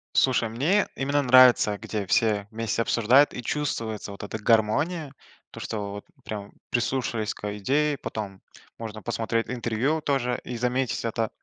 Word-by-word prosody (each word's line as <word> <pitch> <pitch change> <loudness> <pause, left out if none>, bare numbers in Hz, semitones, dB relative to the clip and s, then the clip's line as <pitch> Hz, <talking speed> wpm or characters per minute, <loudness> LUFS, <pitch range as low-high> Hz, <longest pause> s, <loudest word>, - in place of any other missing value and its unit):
Слушай, 125 -3 +3
мне 155 - +2
именно 140 +2 +1
нравится, 125 -5 +6
где 105 -2 -4
все 105 -1 +2
вместе 115 +1 -2
обсуждают, 120 +5 +4
и 125 - -6
чувствуется 115 -7 -3
вот 100 - -9
эта 100 +2 -5
гармония, 135 +9 +1 0.4
то - - -10
что 105 -2 -4
вот 100 0 -8 0.2
прям 105 -2 -6 0.2
прислушаясь 120 -3 -1
к - - -17
а, 105 0 -3
идее, 145 +7 +1
потом 100 -6 -6 0.4
можно 110 -1 -7
посмотреть 115 0 -1
интервью 125 +5 -1
тоже 130 -4 0
и 125 - -5
заметить 125 +1 -1
это. 115 -1 -1
115 Hz, 150 wpm, -26 LUFS, 110-130 Hz, 0.4 s, нравится